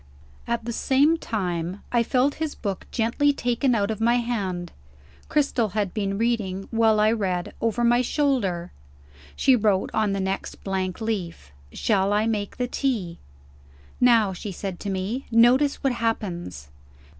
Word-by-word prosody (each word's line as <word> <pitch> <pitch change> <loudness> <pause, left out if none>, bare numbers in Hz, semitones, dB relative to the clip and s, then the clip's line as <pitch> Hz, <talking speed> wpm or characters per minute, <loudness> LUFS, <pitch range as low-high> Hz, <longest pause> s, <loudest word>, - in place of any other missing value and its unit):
At 235 -1 -2
the 235 - -3
same 280 +7 +3
time, 180 - -3
I 240 - +3
felt 255 +4 +2
his 315 -2 -2
book 200 -3 -4
gently 235 +5 +2
taken 245 -1 0
out 205 0 0
of 220 0 -5
my 235 +1 +4
hand. 195 -8 -2 0.6
Cristel 265 - +1
had 205 -3 -1
been 200 -2 -2
reading, 205 -5 -1
while 225 -2 +3
I 215 +1 +4
read, 185 -6 -2
over 230 +1 0
my 240 +1 +4
shoulder. 235 - 0 0.6
She 265 -2 +4
wrote 205 -4 +1
on 215 -2 +1
the 195 - -1
next 190 0 -4
blank 190 0 -2
leaf: 185 - -4 0.2
"Shall 200 - +1
I 210 +1 +2
make 210 -3 -2
the 250 - -1
tea?" 230 -11 -2 0.8
"Now," 230 -5 +4
she 200 +3 -6
said 190 -1 -5
to 205 - -5
me, 195 +7 -3
"notice 245 +5 +4
what 270 -2 +2
happens." 175 - -3
220 Hz, 155 wpm, -24 LUFS, 190-240 Hz, 0.8 s, my